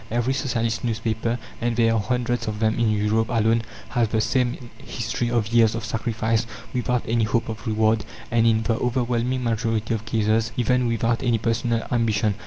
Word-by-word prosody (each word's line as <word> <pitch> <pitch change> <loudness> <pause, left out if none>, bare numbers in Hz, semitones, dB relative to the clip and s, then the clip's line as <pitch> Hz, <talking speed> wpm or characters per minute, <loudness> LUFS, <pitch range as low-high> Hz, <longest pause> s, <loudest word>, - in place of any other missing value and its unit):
Every 120 +3 0
Socialist 115 -5 -1
newspaper 115 0 -1 0.2
and 120 0 0
there 115 -1 +3
are 115 - +2
hundreds 120 +1 -1
of 105 -1 -3
them 110 +1 +1
in 115 -2 +3
Europe 110 +1 +1
alone 115 -1 +2 0.3
has 120 -3 +1
the 110 +1 0
same 120 +1 -1
history 115 +1 -3
of 115 -2 0
years 115 -2 +5
of 115 - -4
sacrifice 115 +1 -1 0.3
without 125 -1 0
any 115 -1 +2
hope 115 +1 0
of 110 0 -6
reward, 110 0 +2 0.3
and, 115 0 +3
in 110 -1 +3
the 115 0 0
overwhelming 125 0 0
majority 115 -1 0
of 110 0 -3
cases, 110 0 +1
even 125 +1 +2
without 115 0 0
any 120 -3 +2
personal 115 +1 0
ambition. 110 -3 +1
115 Hz, 180 wpm, -23 LUFS, 110-120 Hz, 0.3 s, years